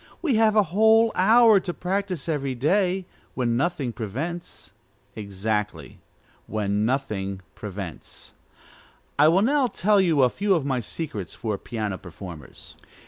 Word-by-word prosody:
We 305 -7 +2
have 220 -1 +3
a 210 - +6
whole 220 +2 +5
hour 220 +2 +6
to 175 -1 -5
practise 185 -3 -3
every 140 -5 -2
day, 185 +7 +1 0.3
when 120 -2 0
nothing 135 -3 -1
prevents." 145 - -6 0.4
Exactly, 105 0 -4 0.5
when 105 -1 -1
nothing 105 -7 -2
prevents. 100 -5 -8 0.9
I 150 - +7
will 180 +5 +4
now 275 +2 +3
tell 205 -1 +2
you 160 -7 +3
a 125 - +5
few 200 -1 +1
of 155 -5 -1
my 135 -3 0
secrets 110 - -5
for 110 -3 -3
piano 105 -5 -4
performers. 85 -6 -10
140 Hz, 135 wpm, -24 LUFS, -, 0.9 s, I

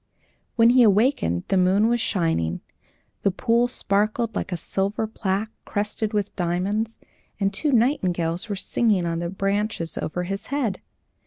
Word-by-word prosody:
When 230 0 +6
he 255 0 +5
awakened 210 - +3
the 195 - +2
moon 190 +4 +4
was 240 0 +1
shining, 165 - 0 0.6
the - - +3
pool 230 +5 +2
sparkled 215 0 0
like - - -3
a 175 - -1
silver 195 +6 -1
plaque 215 0 -2
crusted 210 +1 -2
with 205 -2 -2
diamonds, 195 +5 -1 0.4
and 195 0 +1
two 290 +9 0
nightingales 185 - +1
were 205 - -1
singing 200 -1 +1
in 165 0 -1
the 170 0 -3
branches 195 -2 -2
over 180 +3 -3
his 195 +2 -5
head. 255 -9 -1
200 Hz, 150 wpm, -24 LUFS, 180-225 Hz, 0.6 s, When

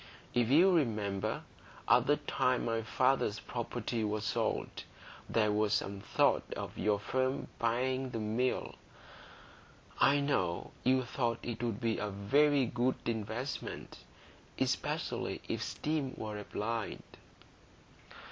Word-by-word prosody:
If 120 -2 +2
you 170 +8 +6
remember, 110 - 0 0.4
at - - +5
the - - +4
time 125 -1 +1
my 115 -1 0
father's 125 -2 +1
property 120 -1 -3
was 105 0 -1
sold, - - -1 0.5
there 105 -2 +3
was 105 0 +2
some 100 0 -2
thought 100 - +3
of - - -5
your 105 -1 +2
firm 130 +6 -1
buying 130 +3 0
the 120 - -4
Mill; 115 +4 0 1.3
I 145 +1 +5
know 95 -12 0
you 130 0 +4
thought 120 -2 -1
it 120 -1 -4
would 115 -3 -1
be 115 -2 0
a 105 - -2
very 135 +8 +3
good 120 +2 +1
investment, 115 +4 -4 0.6
especially - - -1
if - - -2
steam 150 -4 -2
were 105 -1 -4
applied." 110 +2 -3
115 Hz, 120 wpm, -33 LUFS, 105-130 Hz, 1.3 s, you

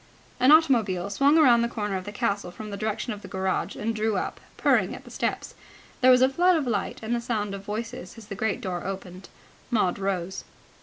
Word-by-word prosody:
An 255 - +4
automobile 225 - +3
swung 280 +9 +4
round 245 -7 +6
the - - +1
corner 210 -4 -3
of 185 -1 -4
the 205 - -6
castle 200 -2 -1
from 210 +4 -8
the - - -4
direction 215 +3 -3
of 205 - -9
the - - -10
garage, 190 -1 -2
and 225 +2 -2
drew 215 -1 0
up, - - -3 0.2
purring, - - +2
at - - -11
the - - -14
steps. - - -3 0.5
There 255 - +6
was 255 0 +7
a - - +7
flood 355 +6 +3
of 310 -4 0
light 220 -5 -2
and 220 +2 -2
the 240 - 0
sound 210 -4 -2
of 195 0 -7
voices, 210 -2 -6
as 225 - -11
the 205 - -7
great 205 +1 -2
door 180 -2 -4
opened. 190 -1 -7 0.4
Maud 210 -6 +1
rose. 190 -2 -2
210 Hz, 220 wpm, -26 LUFS, 195-240 Hz, 0.5 s, was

